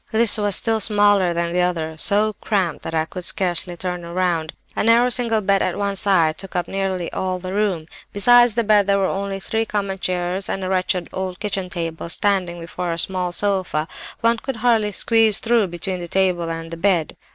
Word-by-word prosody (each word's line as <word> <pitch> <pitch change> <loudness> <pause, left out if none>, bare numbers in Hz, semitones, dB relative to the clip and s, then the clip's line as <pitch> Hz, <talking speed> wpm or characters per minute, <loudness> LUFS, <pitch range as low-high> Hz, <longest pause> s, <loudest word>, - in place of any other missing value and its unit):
"This 225 0 +6
was 205 -2 +2
still 225 -1 +1
smaller 205 -3 +4
than 170 0 -2
the 180 - +1
other, 165 -3 -1
so 210 +5 +2
cramped 190 -7 -1
that 165 - -4
I 160 0 +1
could 180 +2 -8
scarcely 175 -1 -1
turn 180 -1 -4
round; 170 -2 -1 0.2
a - - 0
narrow 235 +3 +4
single 235 -3 +1
bed 195 0 +2
at 185 - -1
one 200 -1 -1
side 175 -6 +2
took 195 -1 -9
up 175 - -1
nearly 190 -3 -3
all 185 -1 -2
the 185 +1 -6
room. 195 -6 -1 0.3
Besides 240 +2 +5
the 235 - +1
bed 205 -2 +3
there 200 0 +3
were 195 - +1
only 195 0 -3
three 220 +3 -2
common 200 -3 -3
chairs, 180 +1 -2
and 195 - -3
a 185 - -3
wretched 185 -1 0
old 185 -1 -4
kitchen 195 -3 -2
table 165 -2 -5
standing 180 -1 0
before 170 +1 -5
a 165 - -3
small 180 +1 -1
sofa. 185 -5 -1 0.3
One 230 0 +2
could 270 +1 -5
hardly 225 -2 +1
squeeze 220 +1 +3
through 230 -3 +1
between 180 +2 -3
the 175 - -6
table 180 -2 0
and 165 0 -6
the 165 - -6
bed. 175 -3 0
190 Hz, 205 wpm, -21 LUFS, 175-205 Hz, 0.3 s, This